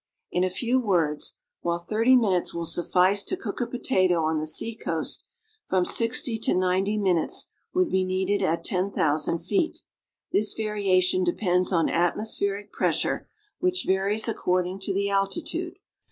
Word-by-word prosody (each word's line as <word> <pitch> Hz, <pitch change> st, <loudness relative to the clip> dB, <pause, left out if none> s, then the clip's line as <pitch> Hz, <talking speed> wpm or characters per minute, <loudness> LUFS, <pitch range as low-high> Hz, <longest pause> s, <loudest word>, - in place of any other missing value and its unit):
In 180 Hz, -, +1 dB
a 185 Hz, -, +1 dB
few 240 Hz, +7 st, 0 dB
words, 170 Hz, -10 st, 0 dB, 0.3 s
while 170 Hz, 0 st, 0 dB
thirty 220 Hz, +8 st, +2 dB
minutes 195 Hz, -10 st, +1 dB
will 170 Hz, 0 st, -3 dB
suffice 185 Hz, +4 st, +2 dB
to 370 Hz, -, -1 dB
cook 220 Hz, -3 st, -5 dB
a 240 Hz, -, 0 dB
potato 185 Hz, -9 st, +1 dB
on 155 Hz, 0 st, 0 dB
the 155 Hz, -, -3 dB
seacoast, 225 Hz, +9 st, -2 dB, 0.4 s
from 185 Hz, -1 st, +1 dB
sixty 230 Hz, -, +2 dB
to -, -, +2 dB
ninety 185 Hz, +3 st, +1 dB
minutes 185 Hz, -5 st, 0 dB, 0.2 s
would 365 Hz, -1 st, +3 dB
be 190 Hz, 0 st, +2 dB
needed 190 Hz, +2 st, 0 dB
at 165 Hz, +1 st, 0 dB
ten 190 Hz, -1 st, 0 dB
thousand 155 Hz, +1 st, 0 dB
feet. 210 Hz, -, -1 dB, 0.5 s
This 210 Hz, +1 st, +2 dB
variation 190 Hz, -4 st, +1 dB
de 175 Hz, -1 st, +1 dB
pends 180 Hz, -2 st, +1 dB
on 165 Hz, -3 st, +2 dB
atmospheric 200 Hz, +3 st, -1 dB
pressure, -, -, -1 dB, 0.3 s
which 365 Hz, 0 st, 0 dB
varies 200 Hz, +4 st, +1 dB
according 185 Hz, -3 st, -1 dB
to 195 Hz, +1 st, -3 dB
the 200 Hz, +1 st, 0 dB
alti 195 Hz, -, 0 dB
tude. 350 Hz, +3 st, -4 dB
190 Hz, 155 wpm, -25 LUFS, 180-220 Hz, 0.5 s, would